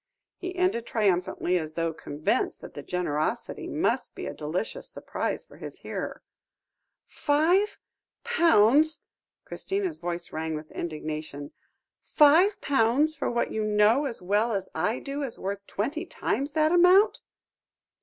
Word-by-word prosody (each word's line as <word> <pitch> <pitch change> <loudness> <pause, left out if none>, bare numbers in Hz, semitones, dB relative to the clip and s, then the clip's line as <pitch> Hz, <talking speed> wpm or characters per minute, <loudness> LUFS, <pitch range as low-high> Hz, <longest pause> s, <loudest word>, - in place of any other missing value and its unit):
he 365 0 -6
ended 360 -11 0
triumphantly, 180 -3 +1
as 155 -1 -7
though 165 -1 -1
convinced 150 -1 -1
that - - -10
the 145 - -7
generosity 155 -2 -2
must - - -1
be - - -6
a - - -4
delicious 155 +8 -4
surprise - - -4
for - - -17
his - - -9
hearer. - - -5 0.8
"Five 335 +8 +2 0.5
pounds!" 315 - +4 0.4
Christina's 385 -4 -3
voice 170 0 -4
rang 160 0 -2
with 155 0 -8
indignation 155 -2 -5 0.5
"five 335 +8 +5
pounds 275 +4 +2
for - - -2
what 240 0 -1
you 220 - -1
know 215 +6 +3
as 235 -8 -5
well 210 +5 +1
as 195 -2 -2
I 180 +9 0
do 280 +1 -5
is 265 -5 -2
worth 200 +1 -5
twenty 305 - -3
times 280 -2 -2
that 310 0 +3
amount." 360 +4 +5
225 Hz, 135 wpm, -27 LUFS, -, 0.8 s, five